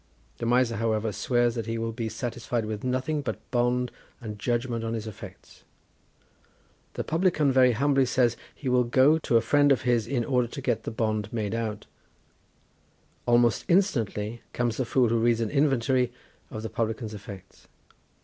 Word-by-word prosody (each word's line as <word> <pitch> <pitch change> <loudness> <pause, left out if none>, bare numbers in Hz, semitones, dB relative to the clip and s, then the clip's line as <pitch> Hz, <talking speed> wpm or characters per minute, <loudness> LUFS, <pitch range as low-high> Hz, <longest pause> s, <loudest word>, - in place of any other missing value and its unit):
The 115 - -2
Miser, 120 -2 +2
however, 110 -1 0
swears 120 +4 +1
that 115 -2 -4
he 115 0 -2
will 115 0 -2
be 115 0 -4
satisfied 120 0 -3
with 105 -1 -5
nothing 130 +4 -1
but 135 - -3
bond 125 0 +1 0.3
and 105 -3 -7
judgment 120 0 -1
on 115 0 -2
his 110 -1 -4
effects. 110 -3 -11 1.3
The - - -3
publican 160 -4 +2
very 130 -1 +5
humbly 135 +2 +2
says 120 -1 +2
that - - -20
he 140 - -7
will 125 0 +3
go 130 +6 +4
to 120 - +2
a - - +3
friend 145 +2 +3
of 130 -1 +2
his, 120 -3 +1
in 120 -2 -1
order 125 -2 +1
to 140 - -8
get 135 - -1
the - - -2
bond 110 -2 -2
made 110 -3 -2
out; 110 -2 -3 1.4
almost 120 -1 +3
instantly 120 - +1
comes 120 -2 -1
the 130 - 0
Fool, 125 0 +2
who 115 0 +2
reads 115 0 +2
an 115 -2 -1
inventory 135 -3 +2 0.4
of 110 - -7
the 110 - -4
publican's 110 -1 -2
effects. 100 -2 -11
120 Hz, 175 wpm, -27 LUFS, 110-130 Hz, 1.4 s, very